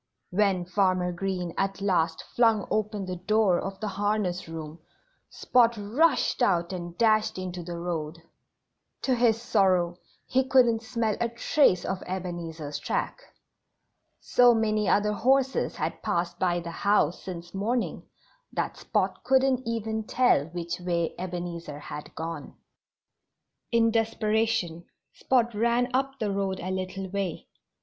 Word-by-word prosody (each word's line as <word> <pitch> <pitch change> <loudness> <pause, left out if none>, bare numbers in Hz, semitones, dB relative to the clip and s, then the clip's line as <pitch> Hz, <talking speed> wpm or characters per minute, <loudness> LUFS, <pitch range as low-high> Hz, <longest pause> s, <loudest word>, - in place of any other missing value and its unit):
When 190 -2 +2
Farmer 185 -1 +1
Green 180 -1 -3
at 195 0 -1
last 170 -5 +1
flung 225 -4 +3
open 210 -2 -1
the 185 -1 -4
door 200 0 +2
of 195 0 -5
the 215 - -3
harness 200 -3 -1
room 160 0 -7 0.5
Spot 235 -2 +3
rushed 255 +10 +2
out 175 -6 +2
and 175 -1 -6
dashed 215 -2 +3
into 185 -1 -5
the 170 0 -6
road. 165 -2 -4 0.8
To 265 - +2
his 235 -2 +3
sorrow 185 -6 +2 0.3
he 260 +1 +2
couldn't 245 -4 +4
smell 225 -2 -1
a 235 - +1
trace 235 - +2
of 190 0 -3
Ebenezer's 170 -5 -5
track. - - -2 1.0
So 245 -1 +5
many 215 -2 +1
other 210 +1 +3
horses 265 +5 +2
had - - -3
passed 175 +1 -1
by 175 -1 +1
the 170 0 -6
house 190 -3 +1
since 175 -2 -8
morning 230 +5 -1 0.5
that - - -2
Spot - - -1
couldn't 260 -2 +2
even 220 -1 -2
tell 245 - +3
which 170 0 -5
way 170 -2 -1
Ebenezer 175 -4 -5
had 150 0 -8
gone. 165 +1 -6 1.2
In 230 -1 +4
desperation 220 -6 0 0.3
Spot 240 -3 +1
ran 235 +3 +1
up 270 +1 0
the 215 -5 -1
road 195 -1 -1
a 185 - -4
little 190 +1 -4
way. 195 -4 -3
195 Hz, 135 wpm, -27 LUFS, 175-225 Hz, 1.2 s, So